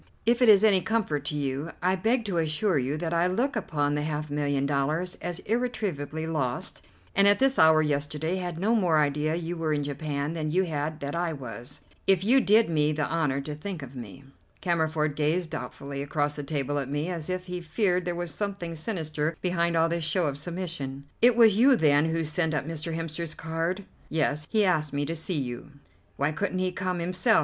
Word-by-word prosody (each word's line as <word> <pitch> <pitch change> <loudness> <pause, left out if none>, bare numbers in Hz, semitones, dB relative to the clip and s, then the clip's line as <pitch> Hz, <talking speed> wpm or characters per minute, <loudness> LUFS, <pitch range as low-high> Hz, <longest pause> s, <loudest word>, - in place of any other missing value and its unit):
If 235 +2 +3
it 245 - +6
is 205 -1 +7
any 200 -4 +5
comfort 180 -8 -1
to 150 - -1
you, 140 +2 -2
I 185 +1 +2
beg 225 +5 +1
to 185 -5 0
assure 160 +2 +1
you 135 +4 -1
that 165 +1 -2
I 170 +1 +3
look 245 +10 0
upon 145 -2 0
the 150 - 0
half 150 0 -3
million 145 -1 0
dollars 150 +6 0
as 175 -1 -3
irretrievably 200 - -2
lost, 140 -7 -2 0.3
and 200 0 +5
at 205 0 +6
this 270 +2 +2
hour 160 0 +6
yesterday 150 +4 -1
had 175 -3 -4
no 205 +6 +1
more 180 -8 +3
idea 150 +1 +1
you 170 0 -3
were 160 -2 0
in 145 -1 0
Japan 145 +1 -3
than 155 -2 -2
you 185 +5 +2
had 155 -2 -3
that 140 0 -3
I 170 -1 0
was, 125 -3 -8 0.3
if 190 -2 +4
you 255 +6 +5
did 220 +1 +5
me 150 -2 +2
the 150 -1 -1
honour 150 -5 0
to 150 +2 -5
think 160 +1 -6
of 135 0 -10
me." 120 +2 -9 0.4
Cammerford 160 -4 0
gazed 160 +3 0
doubtfully 140 0 -5
across 145 +1 -1
the 145 - -4
table 145 -1 -2
at 135 -2 -4
me, 145 +3 -1
as 170 -2 -4
if 185 0 -2
he 180 -1 -5
feared 180 +2 +1
there 175 0 -2
was 175 -1 -4
something 195 -3 -4
sinister 155 -3 -2
behind 170 -2 +1
all 165 0 +4
this 170 0 -1
show 170 +3 +1
of 140 -2 -1
submission. 160 -5 -5 0.2
"It 240 0 +6
was 225 -4 +6
you, 260 +3 +6
then, 150 -6 +4
who 165 0 0
sent 160 +1 -1
up 150 - -2
Mr. 165 0 -3
Hemster's 165 0 -4
card?" 165 +4 -2 0.3
"Yes. 150 -1 0
He 215 -2 +3
asked 155 -5 +1
me 145 0 0
to 165 +3 -3
see 165 +1 -2
you." 130 +2 -5 0.4
"Why 140 +2 +1
couldn't 185 +4 -2
he 185 0 0
come 180 0 -2
himself? 185 +6 +2
160 Hz, 210 wpm, -27 LUFS, 150-185 Hz, 0.4 s, is